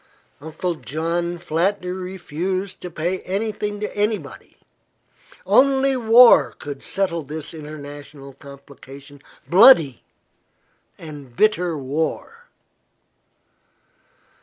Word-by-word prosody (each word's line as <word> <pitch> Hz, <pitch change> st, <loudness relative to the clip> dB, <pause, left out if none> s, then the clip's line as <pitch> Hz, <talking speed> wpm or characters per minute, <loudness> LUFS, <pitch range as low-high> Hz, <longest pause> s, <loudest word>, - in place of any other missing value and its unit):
Uncle 160 Hz, +4 st, -4 dB
John 165 Hz, +5 st, -3 dB
flatly 180 Hz, +3 st, -1 dB
refused 185 Hz, 0 st, -5 dB
to 180 Hz, -, -6 dB
pay 175 Hz, +3 st, -3 dB
anything 205 Hz, +1 st, -4 dB
to 210 Hz, -, -5 dB
anybody. 210 Hz, +1 st, -3 dB, 0.9 s
Only 270 Hz, 0 st, +3 dB
war 240 Hz, 0 st, +6 dB
could 145 Hz, -2 st, -8 dB
settle 180 Hz, -4 st, -2 dB
this 155 Hz, +2 st, -7 dB
international 145 Hz, -2 st, -10 dB
complication 140 Hz, 0 st, -14 dB, 0.3 s
bloody 175 Hz, -, +6 dB, 0.9 s
and 145 Hz, -6 st, -11 dB
bitter 180 Hz, -, +1 dB
war. 160 Hz, -, -4 dB
170 Hz, 85 wpm, -21 LUFS, 145-200 Hz, 0.9 s, war